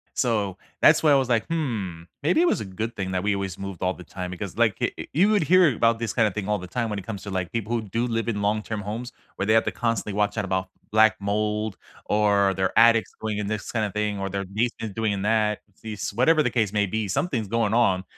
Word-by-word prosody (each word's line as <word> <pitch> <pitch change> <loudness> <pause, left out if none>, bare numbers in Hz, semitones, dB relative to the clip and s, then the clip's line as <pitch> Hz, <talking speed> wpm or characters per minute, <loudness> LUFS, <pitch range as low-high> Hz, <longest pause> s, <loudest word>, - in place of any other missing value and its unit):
So 105 -6 0 0.2
that's - - +6
why 155 - +5
I - - +7
was 135 -2 +2
like, 115 -2 +2
"Hmm, 110 - -2 0.2
maybe 175 - +3
it - - +4
was - - +1
a - - -4
good 110 +5 -4
thing 95 -1 -3
that 90 - -1
we 100 0 +1
always 95 -2 -4
moved 95 -3 -7
all 95 0 +1
the 90 - -12
time 90 -1 -6
because 95 +2 -6
like 110 -4 +3
eh - - +2
eh - - -4
you 195 +7 +4
would 205 -5 +3
hear 175 -5 +5
about 115 +1 +2
this 115 -3 -2
kind 115 -3 +3
of 95 - -8
thing 105 -2 -4
all 105 - +1
the 90 - -8
time 115 +4 -2
when 105 - -3
it 95 - -8
comes 100 -5 -5
to, 100 - -7
like, 95 -2 -2
people 115 -1 -3
who 120 - +1
do 115 +4 -2
live 115 0 -2
in 105 -3 -1
long-term 105 +1 -1
homes 115 +5 -5 0.2
where 100 - -2
they 110 - +3
have 115 - +4
to - - 0
constantly 115 -3 -1
watch 105 +1 0
out 105 - -1
about 95 -1 -1 0.2
black 110 +1 +5
mold 105 +1 -1 0.3
or 100 -2 +3
their 95 +3 0
attics 115 0 +5
going 110 -1 -2
in 105 - -2
this 110 +1 -4
kinda 110 -3 0
thing 105 -1 -1
or 95 - -2
their 100 0 -3
basement 110 +1 -3
doing 110 -2 0
in 100 - -3
that. 105 0 +1 0.2
These 110 -2 -4
whatever 140 +9 +3
the 125 - 0
case 110 -4 0
may 105 -1 +2
be, 110 +2 -2
something's 110 - -1
going 115 -2 +1
on, 95 -6 +3
105 Hz, 265 wpm, -25 LUFS, 100-115 Hz, 0.3 s, I